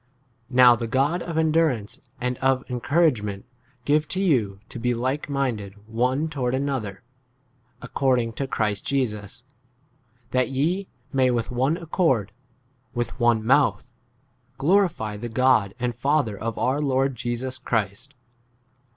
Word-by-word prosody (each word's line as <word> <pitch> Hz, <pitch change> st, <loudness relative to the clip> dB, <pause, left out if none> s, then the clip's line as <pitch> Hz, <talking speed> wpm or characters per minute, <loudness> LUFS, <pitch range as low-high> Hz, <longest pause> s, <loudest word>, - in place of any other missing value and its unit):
Now 125 Hz, -1 st, +7 dB
the 115 Hz, 0 st, -4 dB
God 140 Hz, +8 st, +1 dB
of 170 Hz, -2 st, -4 dB
endurance 155 Hz, -9 st, +1 dB, 0.2 s
and 125 Hz, 0 st, -1 dB
of 135 Hz, 0 st, +2 dB
encourage 140 Hz, +1 st, +2 dB
ment 100 Hz, -2 st, -5 dB, 0.4 s
give 150 Hz, +1 st, +2 dB
to 185 Hz, -, -3 dB
you 120 Hz, -, +1 dB
to 120 Hz, -, -7 dB
be 120 Hz, +1 st, 0 dB
like 130 Hz, +5 st, -2 dB
minded 120 Hz, -8 st, -2 dB
one 125 Hz, +7 st, 0 dB
toward 130 Hz, -5 st, -1 dB
another, 130 Hz, -8 st, -3 dB, 0.8 s
according 125 Hz, -4 st, +1 dB
to 140 Hz, -, -3 dB
6 130 Hz, -, -13 dB
Christ 105 Hz, -2 st, 0 dB
Jesus; 120 Hz, -3 st, -2 dB, 0.9 s
that 130 Hz, 0 st, +1 dB
ye 165 Hz, +9 st, 0 dB, 0.3 s
may 130 Hz, -1 st, +3 dB
with 120 Hz, -1 st, -1 dB
one 130 Hz, +6 st, +1 dB
accord, 155 Hz, -, 0 dB, 0.6 s
with 120 Hz, +1 st, -3 dB
one 120 Hz, -2 st, +3 dB
mouth, 135 Hz, +3 st, +3 dB, 0.7 s
glorify 165 Hz, -, +1 dB
the 120 Hz, +3 st, -5 dB
God 115 Hz, -4 st, +3 dB
and 125 Hz, -1 st, -1 dB
Father 135 Hz, -2 st, +1 dB
of 115 Hz, +2 st, -4 dB
our 135 Hz, +4 st, +1 dB
Lord 135 Hz, -1 st, +1 dB
7 -, -, -11 dB
Jesus 125 Hz, +2 st, -3 dB
Christ. 115 Hz, +3 st, -2 dB
130 Hz, 140 wpm, -24 LUFS, 115-140 Hz, 0.9 s, Now